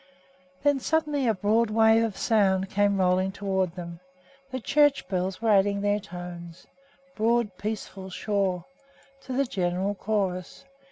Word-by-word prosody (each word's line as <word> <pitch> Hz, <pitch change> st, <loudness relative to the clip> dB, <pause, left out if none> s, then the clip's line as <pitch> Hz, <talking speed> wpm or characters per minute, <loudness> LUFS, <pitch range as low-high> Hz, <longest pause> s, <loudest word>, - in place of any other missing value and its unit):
Then 285 Hz, -1 st, +3 dB
suddenly 295 Hz, -2 st, 0 dB
a 225 Hz, -, +3 dB
broad 215 Hz, +4 st, +2 dB
wave 220 Hz, +1 st, +4 dB
of 220 Hz, -4 st, -3 dB
sound 195 Hz, -4 st, +2 dB
came 200 Hz, 0 st, +2 dB
rolling 185 Hz, +1 st, +2 dB
toward 190 Hz, -3 st, -1 dB
them. 170 Hz, -2 st, -7 dB, 0.5 s
The 260 Hz, -1 st, -4 dB
church 290 Hz, +3 st, +2 dB
bells 185 Hz, +2 st, -2 dB
were 225 Hz, -, +3 dB
adding 200 Hz, 0 st, +3 dB
their 205 Hz, 0 st, +1 dB
tones 175 Hz, -2 st, -9 dB, 0.5 s
broad, 225 Hz, -2 st, +1 dB
peaceful, 200 Hz, -2 st, -5 dB
sure 190 Hz, -2 st, -1 dB, 0.6 s
to 260 Hz, -, -7 dB
the 275 Hz, +2 st, +1 dB
general 185 Hz, -2 st, -1 dB
chorus. 195 Hz, +1 st, -3 dB
200 Hz, 135 wpm, -26 LUFS, 185-225 Hz, 0.6 s, wave